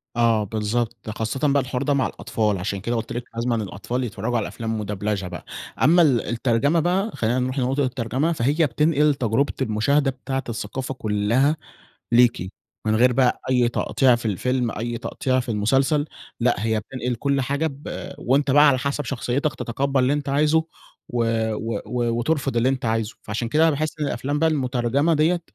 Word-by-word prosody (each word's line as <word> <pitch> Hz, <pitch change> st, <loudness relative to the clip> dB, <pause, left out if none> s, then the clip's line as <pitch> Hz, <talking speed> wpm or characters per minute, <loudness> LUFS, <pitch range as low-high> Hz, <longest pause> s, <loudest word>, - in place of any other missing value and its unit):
آه 115 Hz, -2 st, +3 dB
بالضبط، 110 Hz, +2 st, -2 dB
خاصةً 115 Hz, +7 st, -1 dB
بقى 140 Hz, -1 st, +3 dB
الحوار 125 Hz, +1 st, -3 dB
ده 145 Hz, -, +1 dB
مع 135 Hz, -2 st, +2 dB
الأطفال 105 Hz, -3 st, -1 dB
عشان 95 Hz, +2 st, -3 dB
كده 120 Hz, +4 st, -2 dB
قُلت 115 Hz, 0 st, -3 dB
لِك 120 Hz, 0 st, -3 dB
لازمًا 120 Hz, +1 st, 0 dB
الأطفال 110 Hz, +4 st, -3 dB
يتفرجوا 120 Hz, +1 st, -2 dB
على 110 Hz, -, -1 dB
أفلام 115 Hz, -1 st, -4 dB
مدبلچة 105 Hz, -1 st, -2 dB
بقى، 90 Hz, -1 st, -8 dB, 0.4 s
أمّا 170 Hz, +6 st, +6 dB
ال 135 Hz, -8 st, +4 dB
الترجمة 120 Hz, +7 st, +1 dB
بقى 185 Hz, +6 st, +1 dB
خلّينا 120 Hz, +3 st, 0 dB
نروح 130 Hz, +2 st, -1 dB
لنقطة 135 Hz, +3 st, +1 dB
الترجمة، 130 Hz, +5 st, -1 dB
فهي 150 Hz, +4 st, +2 dB
بتنقل 150 Hz, +2 st, +2 dB
تجربة 130 Hz, +2 st, 0 dB
المشاهدة 135 Hz, +5 st, +2 dB
بتاعة 135 Hz, +1 st, -4 dB
الثقافة 120 Hz, +4 st, -4 dB
كلها 115 Hz, +6 st, +1 dB, 0.6 s
ليكِ، 120 Hz, -6 st, +4 dB, 0.4 s
من 110 Hz, -, +2 dB
غير 125 Hz, +2 st, +4 dB
بقى 125 Hz, 0 st, +2 dB
أي 125 Hz, -2 st, +3 dB
تقطيع 125 Hz, +1 st, +2 dB
في 120 Hz, -, -5 dB
الفيلم، 125 Hz, +4 st, 0 dB
أي 115 Hz, +2 st, -4 dB
تقطيع 130 Hz, +1 st, -1 dB
في 125 Hz, -, -8 dB
المسلسل. 135 Hz, +7 st, +2 dB, 0.4 s
لأ، -, -, +3 dB
هي 110 Hz, +1 st, 0 dB
بتنقل 125 Hz, +2 st, -4 dB
كل 140 Hz, +3 st, 0 dB
حاجة 140 Hz, +4 st, -1 dB
ب 140 Hz, -1 st, -6 dB
وأنت 140 Hz, +3 st, +1 dB
بقى 145 Hz, +2 st, +7 dB
على 135 Hz, -2 st, +3 dB
حسب 140 Hz, +2 st, -2 dB
شخصيتك 135 Hz, +3 st, -1 dB
تتقبل 135 Hz, +3 st, -1 dB
اللي 130 Hz, +2 st, +2 dB
أنت 145 Hz, -1 st, -2 dB
عايزه 150 Hz, +3 st, +3 dB, 0.4 s
و 120 Hz, -1 st, 0 dB, 0.3 s
و 115 Hz, 0 st, -3 dB
و 120 Hz, -1 st, -1 dB
وترفض 135 Hz, 0 st, 0 dB
اللي 115 Hz, +2 st, +3 dB
أنت 135 Hz, -2 st, -1 dB
عايزه. 110 Hz, -1 st, -1 dB
فعشان 115 Hz, +2 st, -3 dB
كده 155 Hz, +5 st, +2 dB
أنا 165 Hz, -, +6 dB
باحس 155 Hz, +2 st, -2 dB
إن 150 Hz, -, 0 dB
الأفلام 140 Hz, +3 st, -2 dB
بقى 160 Hz, +1 st, +3 dB
المترجمة 135 Hz, +2 st, +1 dB
دِيَّة 160 Hz, +3 st, +2 dB
125 Hz, 180 wpm, -23 LUFS, 115-140 Hz, 0.6 s, بقى